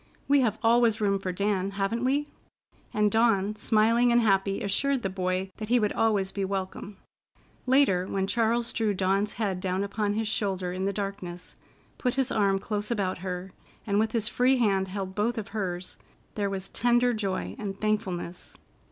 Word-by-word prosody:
We 285 0 +5
have 220 -4 +1
always 230 -1 +4
room 200 -2 +1
for 185 -1 -3
Dan, 195 0 0
haven't 200 +4 -1
we?" 280 +3 +1 0.6
And 210 -1 +2
Dawn, 215 -2 +2
smiling 230 +3 +3
and 240 - +5
happy, 195 -2 +2
assured 260 +6 +1
the 195 - -1
boy 185 0 -2
that 215 -1 -6
he 245 +1 +4
would 210 -2 0
always 205 -4 +1
be 200 - -3
welcome. 195 +1 -4 0.7
Later, 250 -9 +3
when 195 -1 -1
Charles 230 +3 +1
drew 215 -3 0
Dawn's 195 +2 +1
head 200 -5 -2
down 185 +1 -1
upon 205 0 -1
his 220 0 -1
shoulder 190 -4 -1
in 185 +1 -2
the 200 - +1
darkness, 195 -3 -5 0.4
put 250 -2 0
his 265 -2 0
arm 200 -2 +2
close 205 +1 -3
about 195 -6 -1
her, 185 0 -5 0.3
and 200 -1 +1
with 220 0 0
his 225 -2 +1
free 255 +2 +3
hand 195 -5 +2
held 190 0 -5
both 220 +4 0
of 215 -2 -4
hers, 185 -4 -4 0.3
there 205 -2 -1
was 195 -1 -4
tender 245 0 +2
joy 190 - -3
and 195 -1 -5
thankfulness. 190 -5 -3
205 Hz, 180 wpm, -27 LUFS, 190-225 Hz, 0.7 s, We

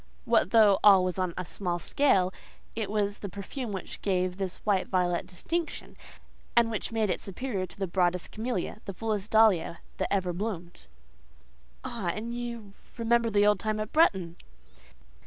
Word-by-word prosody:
What - - +3
though 210 -2 +6
all 195 -3 +8
was 185 +1 -2
on 180 -2 -1
a 185 - -3
small 175 +2 -3
scale, 190 -3 +2 0.4
it 220 -3 -2
was 205 -1 -1
the 200 - -5
perfume 205 +6 -6
which 190 -2 -6
gave 185 -2 0
this 190 -2 -3
white 200 -3 +2
violet 180 -1 0
distinction, 330 - -4 0.6
and 230 -1 +5 0.2
made 220 -3 +1
it - - -2
superior 195 -1 -3
to 175 - -13
the 195 - -1
broadest 180 0 0
camelia—the 215 -3 -4
fullest 215 -1 -2
dahlia 215 -7 +4 0.2
that - - -2
ever 185 -3 0
bloomed. 175 - -5 1.0
"Ah! 230 -6 -4
and 230 +2 -4
you 235 -4 -6 0.2
remember 235 0 +2
the 205 -1 +3
old 210 -2 +4
time 215 0 -1
at 215 +1 -4
Bretton?" 190 - +3
200 Hz, 155 wpm, -28 LUFS, 185-225 Hz, 1.0 s, all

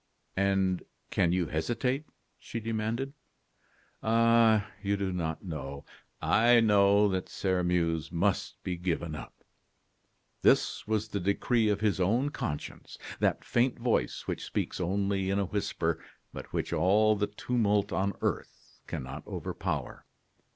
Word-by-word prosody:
"And 95 -2 +2 0.3
can 85 - +2
you 90 -1 +1
hesitate?" 120 - -1 0.3
she 115 - -5
demanded. 115 +4 -2 0.9
"Ah! 115 -1 +4 0.2
you 100 0 0
do 95 -2 -2
not 80 -3 -3
know 70 -4 -6 0.2
" - - -43 0.2
"I 120 0 +7
know 105 -2 +5
that 95 -1 -2
Sairmeuse 90 -4 0
must 95 +3 0
be 90 -2 -3
given 85 -2 -2
up." 75 - -9 1.0
This - - +3
was 110 0 0
the 100 - -2
decree 105 +4 +2
of 105 0 0
his 105 -4 +1
own 115 +10 +2
conscience, 75 - -5 0.2
that - - +1
faint 120 +1 +1
voice 115 - 0
which - - -3
speaks - - -3
only 95 +1 0
in 100 - +1
a 100 - +1
whisper, 100 +2 -2 0.3
but - - -8
which - - -2
all 105 +6 +4
the 105 0 0
tumult 105 -1 0
on 100 +1 0
earth - - -4
cannot 65 0 -5
overpower. - - -4
100 Hz, 135 wpm, -30 LUFS, 90-110 Hz, 1.0 s, I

